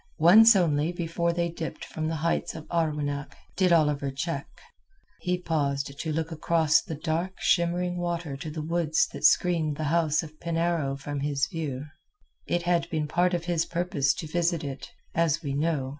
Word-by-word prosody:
Once 215 +8 +8
only 160 -3 +2
before 170 0 -1
they 170 0 0
dipped 165 -1 -6
from 155 -1 -4
the 165 - -2
heights 165 +2 -1
of 155 - -8
Arwenack 150 -4 -1 0.2
did 185 -2 +3
Oliver 150 -4 +3
check. 140 +2 -3 0.7
He 180 0 -1
paused 140 -5 -1
to 160 - -2
look 160 +2 -2
across 160 -1 +2
the 160 - -6
dark 165 +5 -2
shimmering 175 0 +1
water 170 -4 -3
to 145 +3 -6
the 155 0 -5
woods 165 -1 +1
that - - -8
screened 160 -2 +3
the 155 - -3
house 160 -3 +2
of 155 -1 -12
Penarrow 165 -4 0
from 145 0 -4
his 140 -1 0
view. 145 -4 -4 0.6
It 175 0 0
had 170 -1 +1
been 155 -3 -1
part 175 +4 +2
of 170 -1 -4
his 170 -2 +1
purpose 170 -6 0
to - - -6
visit 170 +1 0
it, 140 -1 -6 0.2
as 165 0 +1
we 140 -2 -2
know. 145 -2 0
165 Hz, 175 wpm, -27 LUFS, 150-170 Hz, 0.7 s, Once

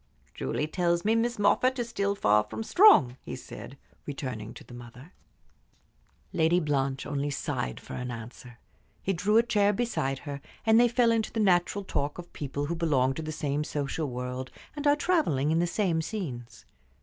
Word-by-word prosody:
"Julie 65 - -2
tells 170 +2 0
me 220 - +4
Miss 235 +1 +1
Moffatt 255 +6 +3
is 240 -2 -2
still 200 -2 0
far 105 - +3
from 225 - -5
strong," 185 - +6
he - - -6
said, - - -10 0.3
returning 130 -6 -5
to - - -11
the - - -14
mother. 120 +6 -12 1.2
Lady 165 +2 +3
Blanche 135 -4 -1
only 145 0 -2
sighed 140 -3 -3
for - - -10
answer. 120 -1 -7 0.5
He 195 - 0
drew 205 +5 +2
a 230 - +6
chair 205 -3 +3
beside 190 - -1
her, 140 -1 -5 0.2
and 220 0 +6
they 240 - +6
fell 240 0 +3
into 225 -1 0
the 225 - -3
natural 190 0 +2
talk 145 -6 -2
of 175 -1 -10
people 145 0 -4
who 170 +3 -2
belong 140 -6 +2
to 160 - -5
the 155 0 -5
same 150 -1 -1
social 145 +1 -3
world, 125 +1 -5 0.3
and 295 0 -2
are 290 - +6
travelling 295 - +1
in 165 - +2
the 175 - +2
same 175 -3 0
scenes. 150 - -6
160 Hz, 180 wpm, -28 LUFS, 135-210 Hz, 1.2 s, strong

